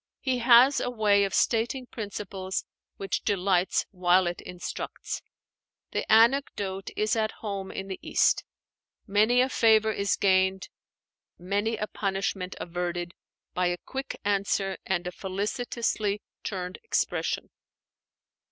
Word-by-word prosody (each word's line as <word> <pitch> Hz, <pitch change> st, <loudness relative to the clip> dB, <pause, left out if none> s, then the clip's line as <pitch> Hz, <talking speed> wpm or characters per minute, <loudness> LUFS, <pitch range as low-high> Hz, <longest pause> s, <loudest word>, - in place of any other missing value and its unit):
He 260 Hz, -2 st, 0 dB
has 245 Hz, +3 st, +6 dB
a -, -, -1 dB
way 210 Hz, -4 st, +3 dB
of 195 Hz, -, -4 dB
stating 240 Hz, +3 st, +1 dB
principles 200 Hz, -4 st, -5 dB, 0.3 s
which 195 Hz, -2 st, -2 dB
delights 190 Hz, -3 st, +1 dB
while 180 Hz, -1 st, +3 dB
it 175 Hz, 0 st, -3 dB
instructs. 180 Hz, 0 st, -6 dB, 0.7 s
The -, -, -2 dB
anecdote 220 Hz, -5 st, +3 dB
is 215 Hz, +1 st, +1 dB
at 220 Hz, -1 st, 0 dB
home 195 Hz, -2 st, -3 dB
in 195 Hz, -, -5 dB
the 190 Hz, -, -5 dB
East: -, -, +2 dB, 0.6 s
many 220 Hz, +4 st, +4 dB
a 255 Hz, -, +3 dB
favor 220 Hz, -3 st, +4 dB
is 200 Hz, -1 st, 0 dB
gained, 190 Hz, -1 st, +2 dB, 0.7 s
many 205 Hz, +5 st, -1 dB
a 210 Hz, -, -1 dB
punishment 195 Hz, -2 st, -2 dB
averted, 175 Hz, 0 st, -3 dB, 0.4 s
by 180 Hz, 0 st, +1 dB
a 175 Hz, 0 st, -1 dB
quick 270 Hz, +8 st, -6 dB
answer 200 Hz, -1 st, +1 dB
and 185 Hz, -2 st, 0 dB
a 180 Hz, -, -3 dB
felicitously 205 Hz, +2 st, -2 dB, 0.2 s
turned 180 Hz, -2 st, -4 dB
expression. 455 Hz, -, -1 dB
200 Hz, 125 wpm, -27 LUFS, 185-220 Hz, 0.7 s, has